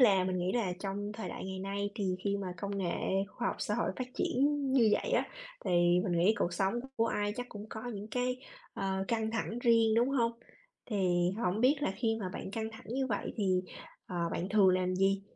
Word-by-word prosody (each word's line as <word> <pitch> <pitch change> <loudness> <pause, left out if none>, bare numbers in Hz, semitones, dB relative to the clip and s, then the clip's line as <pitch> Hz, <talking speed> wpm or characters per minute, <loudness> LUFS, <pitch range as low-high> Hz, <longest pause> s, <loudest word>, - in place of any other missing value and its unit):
là 195 -7 +6
mình 185 0 -1
nghĩ 180 +1 0
là 220 -7 +1
trong 205 +1 -3
thời 220 +1 -5
đại - - -6
ngày 190 0 -5
nay 200 +1 -2
thì 190 -4 -1
khi 200 0 +1
mà 190 -3 -4
công 200 +3 -3
nghệ 175 -3 0 0.4
khoa 240 +3 -2
học - - -3
xã 210 - -1
hội 235 - 0
phát 255 - -2
triển 260 +3 +1 0.3
như 245 -5 +5
vậy 485 - +1
á, - - +3 0.4
thì - - -1 0.3
mình 185 - 0
nghĩ 190 +6 +5
cuộc 175 - +1
sống 190 +4 +1 0.2
của 230 - +3
ai 205 -2 0
chắc 245 - -3
cũng 210 -2 -8
có 220 - -6
những 205 +1 -6
cái, 250 +2 0 0.4
ờ, 190 0 -1
căng 220 -1 0
thẳng 225 0 -2
riêng, 230 -2 +4
đúng 235 +3 +4
hông? 235 -4 +2 0.5
Thì 180 -4 +2
hổng 185 +4 +1
biết 260 +5 +5
là 190 - +1
khi 225 -2 +1
mà 190 - -2
bạn - - -5
căng 220 +1 -3
thẳng 220 - -11
như 265 +3 0
vậy 205 -5 -2
thì, 185 -3 +2 0.4
ờ, 180 - -5 0.2
bạn 180 - -2
thường 200 -2 +5
làm 185 0 +2
gì? 195 +1 +2
205 Hz, 225 wpm, -32 LUFS, 190-230 Hz, 0.5 s, là